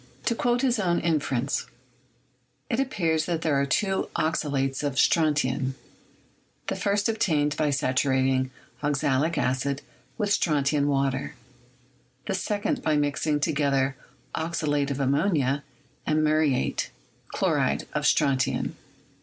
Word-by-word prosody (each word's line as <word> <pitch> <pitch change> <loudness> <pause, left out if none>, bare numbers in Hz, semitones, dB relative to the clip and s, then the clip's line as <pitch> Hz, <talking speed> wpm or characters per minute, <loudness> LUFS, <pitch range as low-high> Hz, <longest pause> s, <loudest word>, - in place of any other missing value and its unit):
To 235 - +2
quote 240 +2 +1
his 245 -4 +2
own 175 -4 +1
inference: 140 -5 0 1.0
"It 230 - +1
appears 170 -12 0
that 170 -2 -1
there 145 -4 +2
are 140 - 0
two 190 +7 0
oxalates 140 -4 0
of 145 -2 -2
strontian, 135 -3 +2 0.9
the - - -2
first 200 +1 +1
obtained 155 -10 +1
by 155 -1 +1
saturating 130 -1 +1 0.3
oxalic 145 +2 +1
acid 140 +1 0 0.3
with 210 -3 -1
strontian 145 -5 +2
water, 135 -1 0 0.9
the - - -2
second 205 +2 -1
by 155 -1 +1
mixing 145 +1 0
together 140 -3 +1 0.4
oxalate 150 -3 -1
of 140 0 -3
ammonia 140 0 +1 0.4
and 155 0 +2
muriate 155 -3 +1 0.5
[chloride] - - +1
of - - -1
strontian. 135 -1 +1
145 Hz, 115 wpm, -26 LUFS, 135-165 Hz, 1.0 s, To